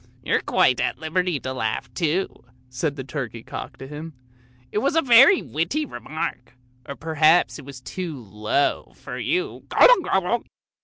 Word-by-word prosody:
" - - -31
You're - - +2
quite 125 - +2
at - - -1
liberty 165 0 -1
to 130 - -4
laugh 110 -4 -3
too," 175 +2 -1 0.3
said 140 +3 -2
the 135 - -6
turkey 125 -4 -6
cock - - -8
to 135 - -9
him; 150 +3 -8 0.3
" 125 0 -32
it 210 - 0
was 280 +7 0
a 325 - +5
very 265 +8 +7
witty 170 - -2
remark, 155 - -6 0.3
or 140 - -4
perhaps 160 +2 +3
it 140 - -11
was 135 -2 -10
too 165 0 -6
low 110 +5 -1
for - - -8
you, 365 +3 -2
gobble, - - +6
gobble. 190 - 0
155 Hz, 170 wpm, -23 LUFS, 130-190 Hz, 0.3 s, very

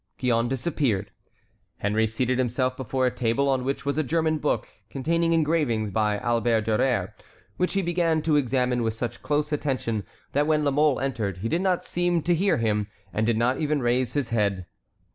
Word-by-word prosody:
Gillonne 120 -2 +1
disappeared. 125 - -1 0.7
Henry 110 +2 +1
seated 125 +3 -1
himself 130 +1 0
before 130 +1 -1
a 125 - +2
table 120 +4 +1
on 135 -2 +1
which 135 +2 -3
was 140 +2 0
a - - +2
German 160 +2 0
book 150 - -1 0.2
containing 165 +5 0
engravings 150 -10 +1
by 105 0 +1
Albert 115 0 +1
Durer, 110 +4 0 0.4
which 180 - 0
he 195 -1 +1
began 165 -2 +1
to 155 -2 +2
examine 125 -3 +1
with 110 -1 -1
such 120 +1 -4
close 150 +1 0
attention 130 -7 -1 0.3
that 145 +2 +1
when 155 -1 +2
La 140 - +2
Mole 145 -1 +3
entered 110 -9 -2
he 100 +5 -3
did 170 - 0
not 185 -2 0
seem 175 -2 0
to 175 - +2
hear 190 +4 +2
him, 105 -3 0 0.3
and 110 +1 0
did 115 -2 +2
not 125 +3 +1
even 150 -1 0
raise 120 -1 +1
his 140 -5 -1
head. 100 -5 0
130 Hz, 185 wpm, -25 LUFS, 115-150 Hz, 0.7 s, Mole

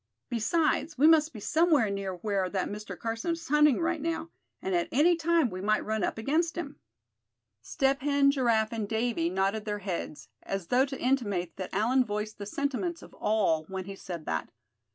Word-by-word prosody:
"Besides, 305 +6 +1
we 285 - +4
must 315 -1 +6
be 220 - -9
somewhere 300 - +3
near 195 -2 -3
where 195 0 -1
that 190 0 -1
Mr. 210 +1 -7
Carson 230 +9 -2
is 330 -1 -7
hunting, 300 -2 +5
right 335 -2 0
now; 330 +1 -3 0.3
and 190 - -3
at 175 -1 +1
any 330 +6 +4
time 330 -5 +2
we 185 0 -5
might 215 +2 +1
run 220 0 -1
up - - -1
against 320 +9 0
him." 295 -4 -5 0.8
Step 270 - 0
Hen, 280 0 +4
Giraffe 235 -5 +1
and 215 -3 -3
Davy 220 -7 0
nodded 195 +4 0
their 210 -1 -2
heads, 185 -6 -5
as 195 -3 -4
though 260 +3 +4
to 270 -1 -6
intimate 205 -10 0
that 185 - -5
Allan 240 +6 +3
voiced 210 -1 -4
the 205 - -5
sentiments 280 - -2
of - - -14
all 195 -7 +1
when 190 +1 -5
he 195 0 -7
said 175 -5 -7
that. - - -2
225 Hz, 190 wpm, -29 LUFS, 200-295 Hz, 0.8 s, must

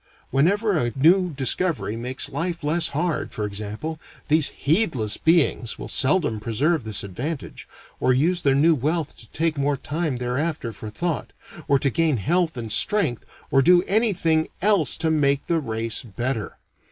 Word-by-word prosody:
Whenever 195 - +2
a 120 -6 0
new 180 +6 +4
discovery 145 - 0
makes 125 +3 -1
life 170 -1 -3
less 160 +3 +1
hard, 155 -1 -2
for 105 - -3
example, 105 +10 -5 0.3
these 155 -1 +5
heedless 140 - 0
beings 160 -8 +1
will - - -7
seldom 135 - +2
preserve 130 +8 0
this 110 -2 0
advantage, 130 - -6 0.3
or 130 - +2
use 165 +8 +2
their 135 -3 +2
new 160 +4 +4
wealth 155 +3 -1
to 115 - -14
take 160 -2 -1
more 140 0 0
time 150 0 -3
thereafter 125 +1 -3
for 110 +1 -8
thought, 160 +9 -3 0.3
or 140 - +4
to 135 0 +1
gain 160 -1 +1
health 165 - 0
and 115 -2 -5
strength 125 - +2 0.3
or 135 - +4
do 175 +5 +5
anything 180 -7 +1
else 195 -8 +3
to 160 -1 0
make 140 -3 +1
the 170 -1 0
race 115 -4 -3
better. 120 0 -4
145 Hz, 160 wpm, -23 LUFS, 120-165 Hz, 0.3 s, these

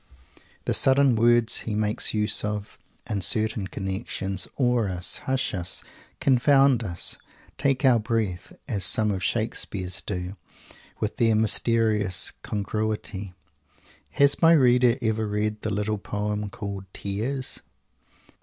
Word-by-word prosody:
The - - 0
sudden 135 -1 +4
words 120 0 +3
he 110 - -4
makes 105 0 +1
use 105 -1 +1
of, 105 -1 -4 0.3
in 100 -2 -2
certain 110 +1 +1
connections, 95 -1 -3
awe 125 -4 +2
us, 90 -1 -3
hush 130 0 0
us, 90 -1 -3 0.4
confound 135 -1 +4
us, 85 -5 -1 0.4
take 135 0 +1
our 125 -3 +5
breath, 105 -5 -2 0.2
as 105 -8 -2
some 110 -1 +3
of 95 -1 -3
Shakespeare's 95 -4 -2
do 90 +1 -5 0.6
with 105 - -3
their 115 -2 +3
mysterious 110 -2 +2
congruity. 105 -2 -4 0.8
Has 140 0 +3
my 165 0 +7
reader 125 -4 +4
ever 110 -1 0
read 105 +1 -2
the 110 - -3
little 105 0 -2
poem 105 +1 -3
called 100 0 -6
"Tears"? 120 +7 -3
110 Hz, 125 wpm, -25 LUFS, 100-120 Hz, 0.8 s, my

